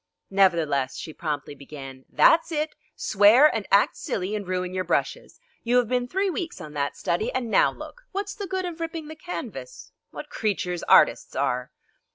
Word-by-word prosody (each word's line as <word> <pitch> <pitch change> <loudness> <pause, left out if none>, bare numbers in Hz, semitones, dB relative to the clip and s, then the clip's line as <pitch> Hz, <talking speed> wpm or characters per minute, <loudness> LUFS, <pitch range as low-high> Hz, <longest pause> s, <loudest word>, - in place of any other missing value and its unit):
Nevertheless 165 -9 +2
she 155 - -7
promptly 150 -3 -4
began: 135 -2 -10
"That's 330 +1 +4
it! 305 0 -1 0.2
Swear 215 +7 +5
and 220 -3 -3
act 200 +1 +4
silly 190 +2 -3
and 205 -3 -5
ruin 180 0 -2
your 185 0 -1
brushes! 175 - -2 0.2
You 240 +1 +2
have 245 -2 +3
been 250 +1 0
three 385 +7 0
weeks 340 - -5
on 155 -4 -9
that 145 -1 -2
study, 215 +8 -1
and 245 -3 -3
now - - +4
look! - - -12
What's 400 +1 -3
the 400 - -6
good 375 0 -2
of 345 -2 -6
ripping 325 -2 -5
the 315 - -8
canvas? 355 +9 -8 0.2
What - - -9
creatures 180 -5 -2
artists - - +4
are!" 125 0 -1
210 Hz, 180 wpm, -25 LUFS, -, 0.2 s, Swear